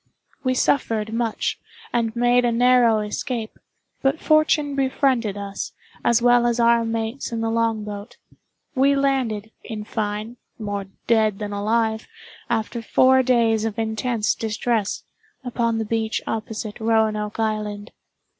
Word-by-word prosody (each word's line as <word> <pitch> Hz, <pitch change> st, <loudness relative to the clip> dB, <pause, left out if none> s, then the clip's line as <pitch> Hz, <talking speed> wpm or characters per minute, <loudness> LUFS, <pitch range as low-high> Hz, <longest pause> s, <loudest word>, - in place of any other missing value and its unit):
We 255 Hz, -1 st, +1 dB
suffered 225 Hz, -5 st, +1 dB
much, 230 Hz, -1 st, -1 dB, 0.3 s
and 230 Hz, -1 st, 0 dB
made 245 Hz, +1 st, +3 dB
a 240 Hz, -, +2 dB
narrow 240 Hz, -2 st, +4 dB
escape; 220 Hz, +2 st, -4 dB, 0.4 s
but 275 Hz, +3 st, +1 dB
fortune 310 Hz, -2 st, +3 dB
befriended 260 Hz, -6 st, +1 dB
us, 200 Hz, -1 st, -5 dB, 0.3 s
as 235 Hz, 0 st, +3 dB
well 245 Hz, 0 st, +5 dB
as 240 Hz, 0 st, 0 dB
our 235 Hz, 0 st, +4 dB
mates 225 Hz, +3 st, -3 dB
in 230 Hz, -1 st, -2 dB
the 225 Hz, 0 st, 0 dB
long 225 Hz, -1 st, 0 dB
boat. 205 Hz, 0 st, -8 dB, 0.6 s
We 275 Hz, +1 st, +3 dB
landed, 255 Hz, -6 st, 0 dB
in 220 Hz, -3 st, -6 dB
fine, 215 Hz, +2 st, -4 dB, 0.2 s
more 205 Hz, -2 st, -4 dB, 0.2 s
dead 220 Hz, -3 st, +3 dB
than 205 Hz, -1 st, -5 dB
alive, 220 Hz, +2 st, 0 dB, 0.4 s
after 230 Hz, 0 st, -1 dB
four 260 Hz, +3 st, +4 dB
days 230 Hz, -4 st, +2 dB
of 225 Hz, -1 st, -3 dB
intense 220 Hz, 0 st, 0 dB
distress, 220 Hz, -1 st, -1 dB, 0.4 s
upon 235 Hz, -2 st, 0 dB
the 225 Hz, -, -1 dB
beach 220 Hz, 0 st, -1 dB
opposite 220 Hz, 0 st, -4 dB
Roanoke 220 Hz, -1 st, +1 dB
Island. 210 Hz, -2 st, -2 dB
225 Hz, 135 wpm, -23 LUFS, 215-245 Hz, 0.6 s, well